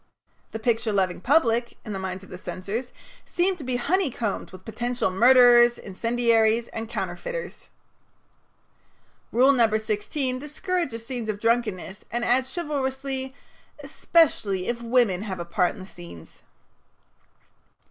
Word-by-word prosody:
The - - -5
picture 225 0 0
loving 185 -3 0
public, 235 -3 +2
in 215 - -5
the 195 - -4
minds 190 0 -5
of 195 - -15
the 180 - -7
censors, 210 +8 -5 0.3
seems 360 +1 0
to - - -7
be 255 -1 -2
honeycombed 250 - -1
with 185 0 -13
potential 240 -2 -2
murderers, 240 +2 +6
incendiaries, 230 +2 +1
and 225 0 -6
counterfeiters. - - -5 1.6
Rule 255 +4 +5
No. 230 -5 +3
16 255 +5 -2
discourages 295 -4 -3
scenes 240 -3 -5
of 205 -1 -2
drunkenness, 225 -4 -1
and 240 +1 -2
adds 255 +2 +2
chivalrously: 265 -4 -3 0.5
"Especially 275 - +1
if 240 0 -2
women 235 -6 +2
have 195 -4 -5
a 170 - -4
part 175 +1 0
in - - -12
the 185 - -8
scenes." 170 - -12
235 Hz, 130 wpm, -25 LUFS, 205-265 Hz, 1.6 s, murderers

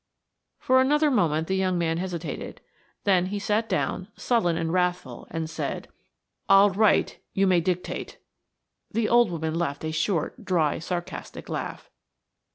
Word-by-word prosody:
For 260 0 +3
another 295 +3 +3
moment 160 - +2
the 190 - 0
young 185 -1 +1
man 165 -1 0
hesitated, 175 -2 -5 0.4
then 185 -3 +3
he 205 +2 -3
sat 210 +2 0
down, 185 - -1
sullen 175 -9 +1
and 165 0 -1
wrathful, 180 -9 -1
and 165 0 -3
said: 160 - -4 0.6
"I'll 195 +1 +7
write–you 195 -1 +1
may 180 -2 +4
dictate–" 180 +1 -3 0.7
The 225 -1 0
old 240 -1 +5
woman 160 -2 -3
laughed 160 -3 -2
a 155 - -2
short, 165 +7 -1
dry, 170 -6 +1
sarcastic 175 +1 -6
laugh. - - -5
180 Hz, 140 wpm, -26 LUFS, 165-205 Hz, 0.7 s, I'll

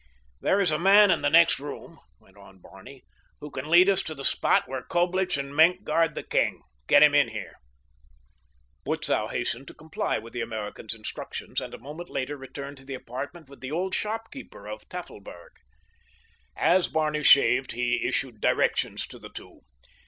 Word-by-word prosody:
"There 195 - +2
is 185 -5 +3
a 155 - 0
man 200 +2 +6
in 170 - +1
the 145 - +2
next 165 0 +5
room," 145 +1 -9 0.2
went 95 - -25
on 100 -1 -16
Barney, 95 +8 -14 0.4
"who 150 - -9
can 135 +3 -6
lead 175 +3 +7
us 195 -1 +3
to 155 - -6
the 135 -1 -7
spot - - +2
where 130 -1 -4
Coblich 180 +3 0
and 140 0 -5
Maenck 175 +5 +4
guard 165 -5 +1
the - - -5
king. - - 0 0.2
Get 145 - +7
him 150 -1 +6
in 145 -3 +5
here." 110 -3 -8 1.2
Butzow - - -1
hastened 135 +4 -3
to - - -11
comply 155 0 -3
with 115 0 -10
the 120 - -3
American's 110 0 -4
instructions, 110 - -5
and - - -7
a - - -10
moment 150 +7 -9
later 135 +3 -3
returned 140 +1 -9
to 135 - -13
the 135 - -5
apartment 135 +6 -7
with 140 0 -15
the 130 +1 -6
old 185 +4 -2
shopkeeper 225 - -5
of 105 0 -9
Tafelberg. 100 - -10 1.1
As 180 +1 +3
Barney 155 -1 -1
shaved 135 -2 +5
he 120 0 0
issued 125 -3 -2
directions - - +1
to - - -13
the - - -11
two. - - -12
145 Hz, 180 wpm, -26 LUFS, 125-170 Hz, 1.2 s, lead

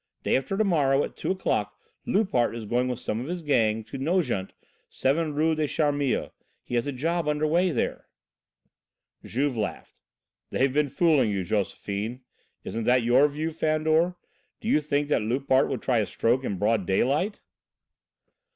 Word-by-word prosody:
Day - - +2
after 135 +9 -1
to 220 - +3
morrow 145 -8 +2
at - - -6
2 - - -4
o'clock, 190 0 -1 0.3
Loupart 190 - +1
is 115 -2 -6
going 120 +4 0
with 125 -2 -2
some 110 - -3
of 130 - -6
his 175 0 -4
gang 115 -7 +2
to 135 - -8
Nogent, 135 - 0 0.4
7 150 +3 0
Rue 160 +2 +2
des 155 -1 0
Charmilles. 145 -3 0 0.3
He - - -9
has 120 +2 +1
a - - -1
job 165 +6 -1
there - - 0
under 150 +1 0
way." 175 +4 +2 1.5
Juve 135 +1 -1
laughed. 105 - -5 0.5
"They've 130 0 +1
been 150 0 +2
fooling 140 -4 +3
you, 100 -2 -1
Josephine. 105 +4 -3 0.4
Isn't 115 0 -4
that 125 0 +4
your 125 +5 +5
view, 155 +3 -3
Fandor? 160 +2 +1 0.4
Do - - -7
you 155 - +3
think 145 -1 0
that 145 - +2
Loupart 130 +4 +2
would 130 -4 -3
try 125 -3 +2
a 105 - 0
stroke 120 +3 +1
in 100 - -2
broad 105 -1 +1
daylight?" 145 - +1
140 Hz, 170 wpm, -26 LUFS, 120-155 Hz, 1.5 s, your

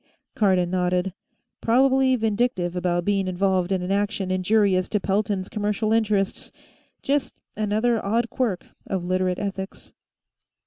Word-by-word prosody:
Cardon 185 -4 +2
nodded. 180 0 0 0.5
Probably 260 +2 +3
vindictive 220 -5 0
about 175 -1 0
being 195 -2 +1
involved 185 0 0
in 185 -2 0
action 200 -1 -1
injurious 185 0 +2
to 210 - +1
Pelton's 195 -1 -1
commercial 215 0 -1
interests; 210 -3 0 0.5
just 280 +1 0 0.2
another 215 +2 +1
odd 230 +4 0
quirk 220 -9 -1 0.2
of 185 -2 -2
Literate 185 0 0
ethics. 195 -1 -6
200 Hz, 120 wpm, -24 LUFS, 185-220 Hz, 0.5 s, Probably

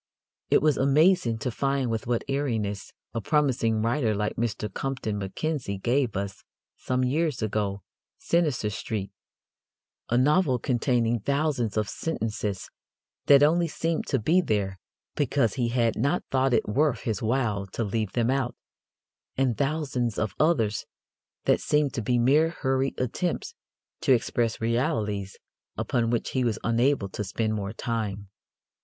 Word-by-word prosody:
It - - +4
was 155 -3 +3
amazing 140 -2 +3
to 125 - -1
find 135 -1 0
with 115 -1 -3
what 120 -1 0
airiness 115 -8 -2 0.2
a 115 - -2
promising 115 -5 +1
writer 115 -2 +1
like 105 +1 -1
Mr. 110 -2 -2
Compton 130 -6 -3
Mackenzie 110 +2 -3
gave 120 +1 0
us 100 -1 -5 0.3
some 130 0 -1
years 145 0 0
ago 100 -2 -1 0.3
Sinister 150 -11 0
Street, 100 -1 -4 1.0
a 120 - +2
novel 145 +1 +3
containing 120 -1 +1
thousands 140 -4 0
of 105 -1 +1
sentences 110 -10 -3 0.6
that 140 0 +7
only 170 +3 +4
seemed 165 +1 -2
to 135 - +1
be 160 - +3
there 100 - -1 0.4
because 140 -4 +1
he 125 -3 0
had 115 -2 +1
not 140 +10 0
thought 130 -1 +3
it - - +1
worth 130 +3 +1
his 110 -4 -2
while 110 -4 0
to 115 - -3
leave 110 -1 -2
them 120 0 +1
out, 135 -2 -1 0.8
and 130 -3 +2
thousands 135 -5 -1
of 110 -4 -1
others 115 - +2 0.6
that - - +3
seemed 150 -2 +1
to 125 - -2
be 120 +3 +1
mere 145 +7 +4
hurried 135 -4 -1
attempts 170 - -2 0.5
to 150 -5 +4
express 115 -1 0
realities 105 -4 -1 0.4
upon 115 -2 0
which 120 0 -1
he 130 - 0
was 115 -3 0
unable 120 -1 +2
to 100 - -5
spend 110 +3 -1
more 100 -2 -3
time. 110 -4 -3
120 Hz, 145 wpm, -26 LUFS, 110-140 Hz, 1.0 s, that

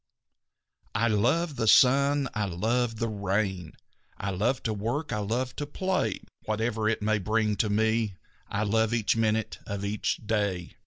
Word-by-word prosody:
"I 115 +2 +2
love 135 +9 +1
the 115 -2 0
sun; 140 +4 +5
I 105 -1 0
love 115 +6 0
the 115 +1 -1
rain; 100 -4 -2 0.4
I 100 - -3
love 115 +8 0
to 110 - -1
work; 120 +9 -2
I 105 - -1
love 120 +5 -2
to 145 - -3
play. 185 +5 -1 0.2
Whatever 110 0 0
it 110 -2 -1
may 110 0 +2
bring 110 +1 +1
to 105 - +1
me 110 -1 +1 0.3
I 105 - -1
love 110 +2 +2
each 115 -2 +1
minute 110 -1 0
of 100 0 -3
each 105 +1 -1
day." 100 -5 -1
110 Hz, 160 wpm, -28 LUFS, 105-120 Hz, 0.4 s, sun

